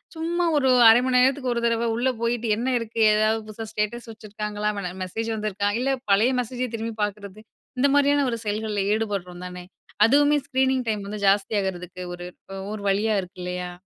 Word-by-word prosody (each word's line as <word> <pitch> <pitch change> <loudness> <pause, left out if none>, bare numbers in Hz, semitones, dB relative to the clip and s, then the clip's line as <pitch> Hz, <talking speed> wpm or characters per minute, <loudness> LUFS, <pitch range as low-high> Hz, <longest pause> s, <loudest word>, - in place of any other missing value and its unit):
சும்மா 340 +2 -1
ஒரு 265 -2 +2 0.2
1/2 235 +2 +6
மணி 255 -1 +1
நேரத்துக்கு 260 -1 +2
1 235 - -2
தரவ 230 0 +1
உள்ளே 255 +2 +1
போயிட்டு, 235 0 -1
என்ன 255 +2 -1
இருக்கு? 225 0 -4
ஏதாவது 215 +1 +2
புதுசா 220 +1 -7
ஸ்டேட்டஸ் 225 +3 -3
வச்சுருக்காங்களா? 210 -1 -4
மன 180 -2 -4
மெசேஜ் 225 +5 -4
வந்திருக்கா? 205 -1 -1
இல்ல 270 +1 +1 0.2
பழைய 225 +6 +4
மெசேஜே 250 +1 -4
திரும்பி 225 0 -4
பாக்குறது. 205 0 -5 0.4
இந்த 280 - +4
மாரியான 285 0 +3
ஒரு 230 - -3
செயல்கள்ல 210 -1 -2
ஈடுபடுறோம் 195 -5 -3
தானே! 180 0 -8 0.4
அதுவுமே 290 +4 +4
ஸ்க்ரீனிங் 260 -1 +1
டைம் 210 -2 -2
வந்து 210 0 -6
ஜாஸ்தி 200 +2 +2
ஆகுறதுக்கு 180 -1 -5
ஒரு 175 0 -9 0.2
ப்போ 195 - -11 0.2
ஒரு 210 - -6
வழியா 210 +2 +1
இருக்கு 180 +1 -12
இல்லயா? 180 0 -4
220 Hz, 180 wpm, -24 LUFS, 200-250 Hz, 0.4 s, 1/2